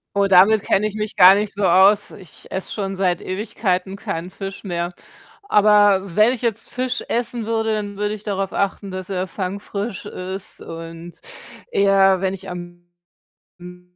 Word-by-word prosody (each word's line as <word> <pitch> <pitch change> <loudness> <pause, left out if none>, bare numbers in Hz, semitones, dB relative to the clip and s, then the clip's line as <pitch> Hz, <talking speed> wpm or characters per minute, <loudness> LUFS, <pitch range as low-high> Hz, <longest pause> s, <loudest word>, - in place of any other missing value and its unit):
Oh, 200 0 +3
damit 195 +3 +5
kenne 210 +2 +2
ich 210 - -7
mich 210 0 -4
gar 185 +2 +8
nicht 210 0 -2
so 200 -1 -1
aus. 190 +4 +5
Ich 185 -6 -14
esse 190 0 -4
schon 195 -2 -3
seit 185 -3 0
Ewigkeiten 190 -1 -2
keinen 180 -2 -5
Fisch 195 +1 -7
mehr. 175 -2 -3 0.5
Aber 205 - +5
wenn 215 +4 +5
ich 250 - -6
jetzt 230 -2 -3
Fisch 255 0 -2
essen 235 -1 -2
würde, 225 0 0
dann 205 -1 -4
würde 210 +1 -1
ich 210 - -13
darauf 195 -2 -2
achten, 200 0 -2
dass 185 0 -6
er 185 0 -2
fangfrisch 200 +3 -5
ist 190 -1 -7
und 165 +1 -9 0.5
eher, 195 -1 +4
wenn 190 -1 0
ich 195 0 -8
am 175 0 -9 0.8
M 180 0 -11
195 Hz, 170 wpm, -21 LUFS, 185-210 Hz, 0.8 s, gar